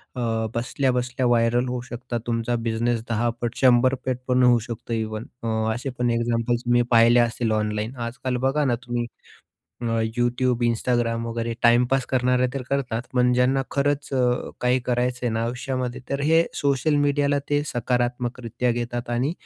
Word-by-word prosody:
अ, - - -5 0.4
बसल्या-बसल्या 125 +1 -1
viral 120 +1 +2
होऊ 125 -1 -3
शकता. 120 0 -4
तुमचा 115 +1 0
बिझनेस 115 +1 0
10 115 +1 +1
पट 120 0 -2
100 130 0 +5
पट 130 -1 0
पण 125 0 +3
होऊ 120 -1 +5
शकतो 115 0 -5
इव्हन. 110 0 -3 0.2
अ, - - -2 0.3
असे 130 +3 -4
पण 120 -1 +2
एक्झाम्पल्स 115 +1 0
तुम्ही 120 0 +4
पाहिले 115 +1 +6
असतील 120 -1 +1
ऑनलाईन. 105 +3 -1
आजकाल 125 +1 -3
बघा 145 +2 +1
ना, 125 -3 +2
तुम्ही 120 -1 -2 0.8
अ, - - -2 0.3
YouTube, 120 0 +1
Instagram 115 0 0
वगैरे 115 0 -3
टाईमपास 125 +2 +4
करणारे 125 0 +2
तर 135 - -3
करतात. 125 -4 -1
पण 125 0 +3
ज्यांना 130 +2 +2
खरंच 145 +1 0
अ, 125 -1 +1
काही 125 +1 +3
करायचं 125 0 0
आहे - - +1
ना 115 - 0
आयुष्यामध्ये, 125 +1 -3
तर 140 0 -1
हे 165 +3 +4
सोशल 140 +2 +1
मीडियाला 145 0 +2
ते 145 0 +2
सकारात्मकरित्या 120 0 -1
घेतात 120 0 -4
आणि 125 +6 0
120 Hz, 160 wpm, -24 LUFS, 120-130 Hz, 0.8 s, पाहिले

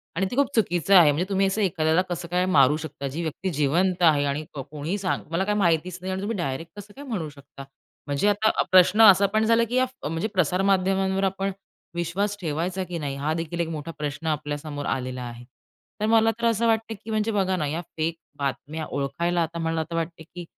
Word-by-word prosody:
आणि 190 +3 +1
ते - - -3
खूप 280 0 +3
चुकीचं 195 -3 +2
आहे. 165 -5 +8
म्हणजे 155 +5 -1
तुम्ही 195 0 +2
असं 195 +3 -1
एखाद्याला 160 -3 +2
कसं 175 -1 -4
काय 180 +1 +1
मारू 150 -5 +4
शकता? 150 -3 -6
जी 145 +5 -4
व्यक्ती 170 +4 -3
जिवंत 170 +6 +1
आहे 150 -4 +5
आणि 140 +2 -2
कोणीही 150 +6 -4
सांग 185 -2 -1
तुम्हाला 170 +4 -1
काही 210 0 0
माहितीच 170 -1 +1
नाही 190 +1 -4
आणि 190 - -3
तुम्ही 210 +2 -2
डायरेक्ट 150 0 -4
कसं 205 +1 -12
काय 285 - -9
म्हणू 195 - -3
शकता? 140 -1 -13 0.4
म्हणजे 145 +7 0
आता 210 +2 +2
प्रश्न 185 +3 +6
असा 200 -2 +8
पण 220 0 +3
झाला, 230 +1 +4
की 230 +2 -3
या 255 0 +4 0.2
म्हणजे 165 +5 -2
प्रसारमाध्यमांवर 190 +2 +1
आपण 195 +1 0 0.4
विश्वास 190 +5 -1
ठेवायचा, 175 +4 -2
की 180 -1 -5
नाही. 140 -3 -3
हा 145 +3 -1
देखील 165 +1 -4
एक 170 - 0
मोठा 155 0 -5
प्रश्न 150 +2 -4
आपल्यासमोर 145 -1 -3
आलेला 130 0 -3
आहे. 120 0 -8 0.6
तर - - +2
मला 225 0 +4
तर 235 - -1
असं 230 0 +2
वाटतं, 225 0 +1
की - - -8
म्हणजे 215 +1 0
बघा 190 -3 +1
ना, 155 - -1
या 160 +4 -2 0.2
फेक 160 +1 -1 0.2
बातम्या 150 +3 -3
ओळखायला 170 +6 -1
आता 165 +1 -5
मला 165 -1 -1
तर - - -3
वाटते, 165 0 -3
की 175 +2 -10
170 Hz, 210 wpm, -25 LUFS, 150-195 Hz, 0.6 s, आहे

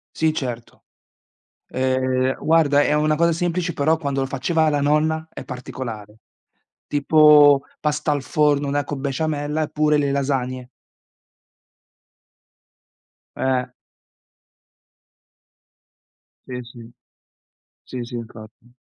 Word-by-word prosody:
Sì 160 -1 +1
certo. 120 -5 -6 0.9
Uhm, 130 0 0
guarda 155 -3 +4
è - - +1
una 155 0 +2
cosa 170 +2 +2
semplice 175 +1 -1
però 155 +3 +2
quando 140 -3 -3
lo - - 0
faceva 160 +5 0
la 145 -2 +1
nonna 155 +2 +1
è - - -9
particolare. 115 -5 -7 0.7
Tipo 145 -1 +5 0.2
pasta 150 0 -1
al 145 -2 -1
forno, 145 0 +1
una 145 +1 -1
co' 145 - -5
besciamella, 145 +2 -2
eppure 150 0 +1
le 140 -1 0
lasagne. 130 -2 -2 2.7
Eh. 130 -1 -1 2.8
Sì, 125 -1 -6
sì. 120 -1 -13 0.9
Sì 130 - -8
sì 120 +1 -8
infatti. 115 0 -11
145 Hz, 100 wpm, -21 LUFS, 130-150 Hz, 2.8 s, Tipo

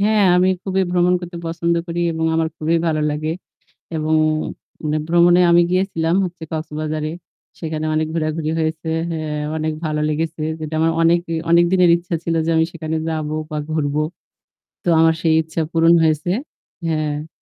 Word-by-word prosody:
হ্যাঁ 210 0 +3
আমি 185 +1 +4
খুবই 190 0 0
ভ্রমণ 180 0 +3
করতে 175 0 -8
পছন্দ 170 +1 0
করি 170 0 -3
এবং 160 0 -2
আমার 160 0 +1
খুবই 160 +2 +1
ভালো 155 -2 +1
লাগে। 155 +1 -2 0.7
এবং 155 0 0 0.7
মানে 155 0 0
ভ্রমণে 175 +1 +5
আমি 170 0 +6
গিয়েছিলাম 180 -3 +1
হচ্ছে 175 -2 -7
কক্সবাজারে। 155 -1 -3 0.5
সেখানে 155 -1 -3
অনেক 155 0 +1
ঘোরাঘুরি 155 -1 -1
হয়েছে। 160 0 -2 0.2
অ্যাঁ 155 -2 -3
অনেক 155 0 -1
ভালো 155 -1 -1
লেগেছে। 155 +1 -2 0.2
যেটা 155 0 -5
আমার 165 0 +3
অনেক 170 +1 +4 0.3
অনেকদিনের 175 +1 +5
ইচ্ছা 175 0 -5
ছিল 165 - 0
যে - - +1
আমি 160 - +4
সেখানে 160 -2 -3
যাবো 155 -1 -2 0.2
বা 155 - -2
ঘুরবো। 150 -1 0 0.8
তো - - -8
আমার 160 0 +5
সেই 160 -2 +3
ইচ্ছা 160 +1 -3
পূরণ 165 0 +4
হয়েছে 155 +1 +1 0.6
হ্যাঁ। 155 -1 -2
160 Hz, 160 wpm, -20 LUFS, 155-170 Hz, 0.8 s, আমি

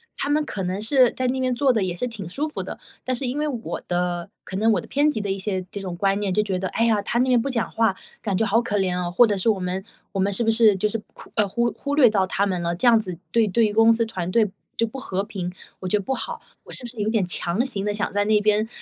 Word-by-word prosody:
他 280 - -3
们 300 +1 +2
可 195 - -5
能 185 +3 -2
是 255 +1 +4
在 255 - -3
那 260 +1 0
边 255 -1 +1
坐 265 0 +3
得 215 -4 +1
也 180 -2 -2
是 250 - -2
挺 200 -7 -7
舒 290 - -2
服 305 - -5
的， - - -7 0.2
但 255 0 -1
是 260 - -3
因 270 +4 -2
为 300 - 0
我 240 -5 -4
的 175 0 -1 0.2
可 190 - -7
能 220 +2 +3
我 185 - +2
的 - - -13
偏 295 +2 +2
激 220 - -3
的 200 -1 -2
一 195 - -1
些 190 -2 -2
这 200 - -5
种 180 -2 -5
观 195 +1 +2
念 195 -3 -1
就 210 - +3
觉 190 -3 -2
得： 185 - -2
“哎 230 - +1
呀， 215 -3 +3
他 235 +4 -1
那 255 - +3
边 245 -2 +4
不 275 - -2
讲 235 -3 -1
话， 225 -4 +2 0.3
感 200 -4 -1
觉 225 - +2
好 220 +3 +3
可 210 -3 -1
怜 185 -2 +1
哦“， 175 -1 -2
或 235 +7 +6
者 205 -2 0
是” 190 - +2
我 205 -3 +2
们 180 +1 -3 0.3
我 195 - -2
们 200 +2 +2
是 235 +4 0
不 225 - +3
是 220 -3 +5
就 210 +3 +1
是 225 - -1 0.2
苦 - - -14
呃， 210 - +3
忽 235 +6 -1
略 255 -6 +7
到 195 -3 +2
他 200 +2 +1
们 185 -3 -1
了？ 170 0 -1
“这 245 - +2
样 230 -1 +7
子 185 -5 -4
对 230 -2 +3
对 210 +1 +2
公 225 +1 +6
司 230 0 +1
团 185 -5 -4
队 220 -1 +3 0.3
就 230 - +3
不 265 +5 -7
和 195 -6 -2
平， 190 -4 -5 0.3
我 185 - -5
觉 210 - +2
得 200 - -4
不 265 - -1
好。 - - -5 0.2
我 - - -13
是 - - -3
不 240 - -5
是 235 - -14
有 215 - 0
点 220 -5 +1
强 175 +5 0
行 205 -7 -2
地 205 - 0
想 210 - -2
在 205 0 +2
那 215 0 +4
边， 215 +1 +2
210 Hz, 330 characters per minute, -23 LUFS, 190-235 Hz, 0.3 s, 略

